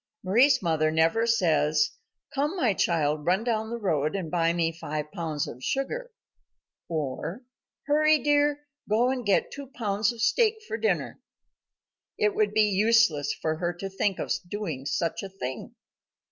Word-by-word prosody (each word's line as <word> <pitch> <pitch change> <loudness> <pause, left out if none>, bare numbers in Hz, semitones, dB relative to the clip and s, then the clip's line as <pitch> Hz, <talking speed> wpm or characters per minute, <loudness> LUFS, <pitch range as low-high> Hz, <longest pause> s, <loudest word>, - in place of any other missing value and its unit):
Mari's 245 +7 +4
mother 160 -2 +2
never 165 +9 +2
says, 155 -8 +2 0.4
"Come, 295 +5 0
my 245 - +2
child, 155 -4 0
run 185 +5 +2
down 220 -2 -1
the 235 - -3
road 155 -7 0
and 175 -5 -4
buy 165 -1 +2
me 170 -1 0
five 150 -2 -5
pounds 160 -6 -3
of 125 +2 -9
sugar," 480 - -2 0.8
or, 160 - -4 0.4
"Hurry, 305 +1 +4
dear, 290 +1 +1 0.2
go 235 +4 +3
and 255 -2 -3
get 200 -3 +1
two 280 -1 -8
pounds 210 -4 -1
of 235 - -11
steak 450 - +3
for 445 - -3
dinner." 450 - -1 1.0
It 425 -1 +2
would 430 +1 +1
be 215 - +4
useless 210 -6 +3
for 155 0 0
her 175 +1 -1
to 195 +3 -7
think 195 0 0
of - - -4 0.2
doing 160 -10 -4
such 165 +2 -1
a 195 - -7
thing. 130 -10 -6
195 Hz, 160 wpm, -27 LUFS, 160-250 Hz, 1.0 s, Mari's